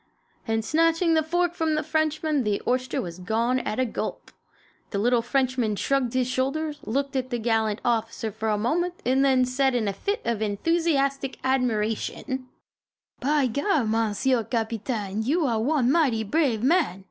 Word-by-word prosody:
and 225 0 0
snatching 330 +3 +2
the 320 - +4
fork 350 +2 0
from 320 -3 0
the 310 - 0
Frenchman 310 -2 0
the 210 -2 0
oyster 255 +1 0
was 175 -1 -5
gone 230 +7 0
at 215 - -3
a 255 - +3
gulp. 230 - -5 0.6
The 200 - -3
little 240 +3 +3
Frenchman 250 -3 0
shrugged 255 +2 0
his 255 -1 +2
shoulders, 290 +4 -1
looked 275 +4 -2
at 255 -1 -1
the 240 - -1
gallant 220 -2 0
officer 225 -2 -1
a 220 -1 +1
moment 345 +11 0
and 260 +2 +3
then 260 -2 +4
said 260 +1 +1
in 225 -4 0
a 200 - 0
fit 405 - -3
of 230 -2 -1
enthusiastic 275 +4 0
admiration: 250 0 -1 0.7
"By 290 +1 +2
gar, 285 - +1
Monsieur 225 +3 +1
Capitaine, 220 -2 -2
you 300 +8 +1
are 230 -4 +1
one 265 0 +2
mighty 270 -9 +2
brave 240 -1 +1
man! 280 - +2
255 Hz, 160 wpm, -25 LUFS, 225-295 Hz, 0.7 s, the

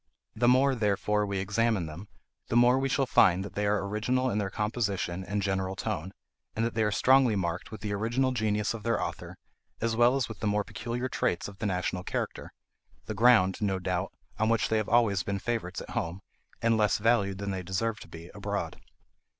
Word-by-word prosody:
The 120 +2 +2
more, 130 +2 +5
therefore, 105 -2 0
we 100 -1 -2
examine 105 0 +1
them, 80 +6 -8 0.4
the - - -2
more 120 +2 +5
we 135 0 0
shall 135 +1 +1
find 95 -5 +4
that - - -9
they 105 0 -1
are 100 -1 +1
original 125 +5 0
in 105 - 0
their 100 -2 -1
composition 105 -4 -2
and 100 +2 -2
general 95 -1 -1
tone, 95 -1 -3 0.4
and 115 - 0
that 115 - -2
they 110 - 0
are 105 -1 +2
strongly 130 0 +4
marked 90 -2 -2
with 110 -2 -8
the 105 -1 -3
original 120 +6 0
genius 105 -3 0
of 115 - -6
their 115 +2 0
author, - - -5 0.4
as 115 0 0
well 120 +2 +4
as 135 - 0
with 110 - -9
the 110 - -1
more 105 0 +1
peculiar 120 +4 -4
traits 85 -8 -1
of 100 -1 -12
the 110 - -1
national 90 -1 -2
character,—the 110 - -7
ground, 110 -4 +4
no 100 -2 +1
doubt, 90 +1 -2 0.3
on 110 0 +2
which 115 -1 +2
they 110 - +2
have 110 - -1
always 110 -5 +3
been 100 +1 -2
favourites 110 -3 -3
at - - -9
home, 85 +4 -3 0.4
and 115 -1 +3
less 105 -2 +3
valued 105 -3 +2
than 100 0 -3
they 95 -1 -3
deserve 100 +4 -2
to - - -11
be 85 +1 -11
abroad. - - -4
105 Hz, 205 wpm, -29 LUFS, 95-115 Hz, 0.4 s, more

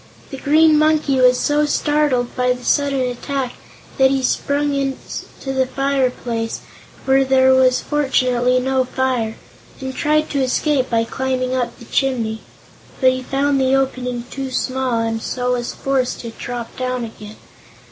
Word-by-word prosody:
The 270 - -6
Green 310 +2 +4
Monkey 305 -3 +2
was 250 0 +5
so 295 +1 +2
startled 295 -5 +1
by 250 0 +2
the 250 0 -10
sudden 280 -2 +2
attack 255 +1 -3 0.5
that 265 0 +6
he 270 -1 0
sprang 285 +3 0
into 270 0 -4
the 260 -1 +1
fireplace 255 -4 -1 0.4
where 270 0 +4
there 260 0 +4
was 255 -1 +4
fortunately 255 -3 +1
no 260 +1 +1
fire 250 -3 -1 0.4
and 265 -1 -5
tried 305 +1 +1
to 280 - 0
escape 260 +1 +1
by 230 -1 +2
climbing 255 +1 -2
up 240 -2 -2
the 235 - -13
chimney. 230 -4 -1 0.6
But 260 -1 +5
he 255 0 -3
found 275 +1 0
the 265 0 +3
opening 250 -2 -1
too 270 -1 -4
small, 255 -2 -1
and 225 0 -2
so 250 +1 -2
was 245 -1 -2
forced 270 -2 -1
to 230 - -7
drop 240 0 -6
down 255 -1 -2
again. 215 -1 -11
260 Hz, 155 wpm, -19 LUFS, 250-275 Hz, 0.6 s, that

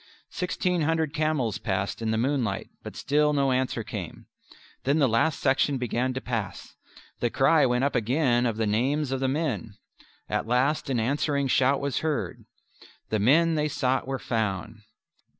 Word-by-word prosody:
Sixteen 180 -1 -1
hundred 160 -1 0
camels 150 -9 0
passed 100 +1 -2
in 110 - -1
the 110 - +1
moonlight, 120 -5 -1
but - - -9
still 150 +1 +2
no 140 -2 +2
answer 130 -2 0
came. 105 -7 -7 0.6
Then 140 +4 +2
the 140 -4 +4
last 140 +7 +1
section 140 +1 +2
began 125 +1 -1
to - - -1
pass. 115 -6 -5 0.5
The 120 - +1
cry 135 +3 +4
went 125 +1 +1
up 140 - +1
again 125 +1 +2
of 115 -2 -2
the 110 - 0
names 130 +7 0
of 135 - -1
the 135 - 0
men. 130 -7 -2 0.5
At - - -2
last 135 +5 +1
an 125 -3 +1
answering 140 +3 0
shout 135 +2 +3
was 140 -2 -1
heard. 155 -2 -3 0.6
The 110 - 0
men 160 +10 +4
they 150 -1 +1
sought 130 -3 0
were 135 0 -2
found. 110 -3 -3
130 Hz, 170 wpm, -26 LUFS, 115-145 Hz, 0.6 s, the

